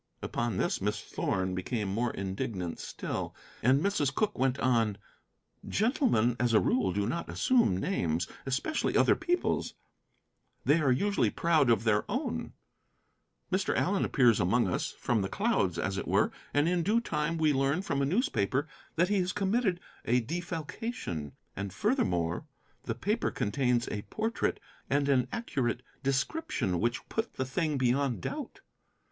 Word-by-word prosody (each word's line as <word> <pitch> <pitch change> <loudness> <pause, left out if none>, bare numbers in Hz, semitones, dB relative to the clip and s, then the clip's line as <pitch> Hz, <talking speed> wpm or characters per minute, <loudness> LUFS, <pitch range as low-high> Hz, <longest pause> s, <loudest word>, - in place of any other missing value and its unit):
Upon 120 -1 -1
this - - 0
Miss 105 +2 0
Thorn 95 -3 -2
became 105 +3 -2
more 115 +5 0
indignant 95 -2 -4
still, - - -4 0.3
and 130 +4 +4
Mrs. 155 -9 +1
Cooke 215 - 0
went 130 0 +1
on 115 -5 +2 0.7
"Gentlemen, 215 - +2
as 120 -1 +2
a 110 - +7
rule, 110 -7 +2
do 100 +2 0
not 145 +10 -3
assume 240 - +3
names, 90 - 0 0.2
especially 140 - 0
other - - +5
people's. 355 0 -1 0.9
They 150 +3 +5
are 140 -3 +3
usually 200 +11 +2
proud 160 -6 +2
of 115 -2 +3
their 105 -2 +3
own. 260 +8 -2 1.0
Mr. 185 +1 +1
Allen 195 +2 +1
appears 120 -6 +4
among 105 +5 +3
us, 90 - -1
from 115 -3 0
the 95 - -2
clouds, 200 - +1
as 95 +2 -1
it - - -5
were, - - +3 0.2
and 145 +2 +2
in 175 0 +2
due 210 +7 +3
time 165 -6 -1
we 155 -2 +3
learn 140 +6 +1
from 140 -6 -1
a - - +2
newspaper 140 - +1 0.3
that 175 +3 +3
he 205 -1 +2
has 180 0 0
committed 195 -1 +1 0.2
a 125 +2 +3
defalcation. 160 - -4 0.2
And, 100 0 -4
furthermore, 90 - 0 0.4
the - - -2
paper - - 0
contains 125 +1 0
a 105 - -3
portrait 225 - -2 0.3
and 140 +1 +2
an 130 -3 +3
accurate 125 - -2 0.2
description 135 - 0
which 120 +4 -1
put 225 +1 -3
the 130 - -1
thing 150 +2 -1
beyond 130 -4 +1
doubt. - - -5
135 Hz, 150 wpm, -30 LUFS, 105-180 Hz, 1.0 s, a